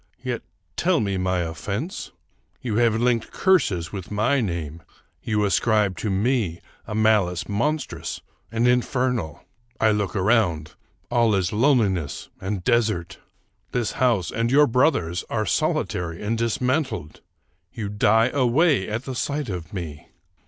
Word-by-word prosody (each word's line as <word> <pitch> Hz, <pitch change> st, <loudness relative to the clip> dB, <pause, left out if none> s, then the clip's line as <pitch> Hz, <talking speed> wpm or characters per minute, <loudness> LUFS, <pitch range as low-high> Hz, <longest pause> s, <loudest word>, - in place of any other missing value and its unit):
Yet 125 Hz, -3 st, -2 dB, 0.4 s
tell 175 Hz, -2 st, +2 dB
me 100 Hz, -2 st, -1 dB
my 90 Hz, -1 st, 0 dB
oflEense! 100 Hz, -, -4 dB, 0.5 s
You 110 Hz, -4 st, -2 dB
have 115 Hz, -2 st, +3 dB
linked 120 Hz, 0 st, +1 dB
curses 105 Hz, -, +2 dB
with 95 Hz, -4 st, -6 dB
my 110 Hz, +7 st, +1 dB
name; 85 Hz, -4 st, -4 dB, 0.4 s
you 105 Hz, -2 st, 0 dB
ascribe 105 Hz, -1 st, +2 dB
to 110 Hz, -, -2 dB
me 100 Hz, -3 st, 0 dB, 0.3 s
a 105 Hz, -, -4 dB
malice 105 Hz, -6 st, +2 dB
monstrous 140 Hz, +9 st, -2 dB, 0.3 s
and 115 Hz, +1 st, +2 dB
infernal. 125 Hz, -, 0 dB, 0.4 s
I 110 Hz, -, +4 dB
look 105 Hz, -3 st, -1 dB
around: 95 Hz, -7 st, +1 dB, 0.4 s
all 115 Hz, -3 st, +3 dB
is 95 Hz, -1 st, 0 dB
loneliness 105 Hz, -, +1 dB
and 95 Hz, -1 st, -3 dB
desert! 110 Hz, -6 st, 0 dB, 0.5 s
This 120 Hz, -3 st, 0 dB
house 120 Hz, -9 st, +1 dB
and 115 Hz, +1 st, 0 dB
your 145 Hz, +3 st, +6 dB
brother's 115 Hz, -, +1 dB
are 110 Hz, -2 st, -1 dB
solitary 85 Hz, 0 st, -1 dB
and 110 Hz, +3 st, 0 dB
dismantled! 115 Hz, -, -1 dB, 0.5 s
You 110 Hz, -4 st, -5 dB
die 110 Hz, +3 st, +3 dB
away 135 Hz, -, +2 dB
at 110 Hz, +4 st, -3 dB
the 130 Hz, -, -4 dB
sight 145 Hz, +1 st, -2 dB
of 90 Hz, -4 st, -5 dB
me 85 Hz, -4 st, -6 dB
110 Hz, 135 wpm, -24 LUFS, 95-125 Hz, 0.5 s, your